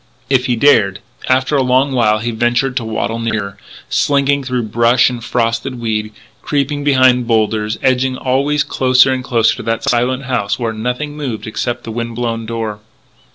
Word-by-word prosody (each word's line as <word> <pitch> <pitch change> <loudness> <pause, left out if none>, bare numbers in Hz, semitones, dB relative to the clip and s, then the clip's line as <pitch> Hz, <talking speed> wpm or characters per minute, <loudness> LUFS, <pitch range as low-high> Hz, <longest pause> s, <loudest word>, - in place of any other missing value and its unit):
If 130 -1 +2
he 125 - +1
dared 105 -7 +3 0.3
And 130 - +5
after 130 +3 -2
a 140 - +3
long 130 +2 +2
while 110 -4 +2
he 115 +2 -3
ventured 120 +3 0
to 120 - -1
waddle 110 +1 -3
nearer, 110 -3 -3 0.3
slinking 140 0 +1
through 125 -2 -2
brush 115 +3 +3
and 120 -2 -7
frosted 120 +2 -1
weed, 110 -2 -2 0.3
creeping 145 0 -1
behind 130 -3 +3
boulders, 110 -1 0
edging 130 0 +1
always 140 +3 +1
closer 130 0 +3
and 130 -1 -3
closer 115 -3 +1
to - - -6
that 115 - -1
silent 125 +2 0
house 125 -6 -1
where 115 -3 -2
nothing 125 +7 -3
moved 135 -7 -5
except 120 +2 -3
the 115 - -6
wind 115 0 -4
blown 115 -1 -3
door. 110 -2 -4
120 Hz, 175 wpm, -16 LUFS, 115-130 Hz, 0.3 s, And